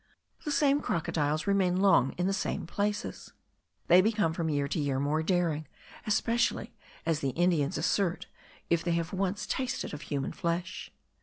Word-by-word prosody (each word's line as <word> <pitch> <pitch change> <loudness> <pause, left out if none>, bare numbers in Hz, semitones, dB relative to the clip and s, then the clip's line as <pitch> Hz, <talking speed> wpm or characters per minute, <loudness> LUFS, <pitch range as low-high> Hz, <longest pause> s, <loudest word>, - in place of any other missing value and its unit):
The 300 - -1
same 285 0 +3
crocodiles 155 -2 -1
remain 190 -2 +2
long 190 -9 +4
in 180 - -2
the 195 - +1
same 195 - -2
places. 205 +4 -3 0.5
They 180 +2 +7
become 210 -5 +1
from 165 -1 -1
year 145 -2 0
to 155 - -2
year 140 -3 0
more 145 +3 +1
daring, 160 -3 0 0.4
especially, 230 +2 +1 0.3
as 165 -2 +1
the 140 - -1
Indians 175 -3 +2
assert, 190 -4 0 0.4
if 170 -1 +1
they 175 - 0
have 170 +1 -2
once 195 +1 -1
tasted 255 -4 -2
of 150 - -6
human 140 -3 -3
flesh. 175 +3 -3
175 Hz, 160 wpm, -30 LUFS, 155-200 Hz, 0.5 s, They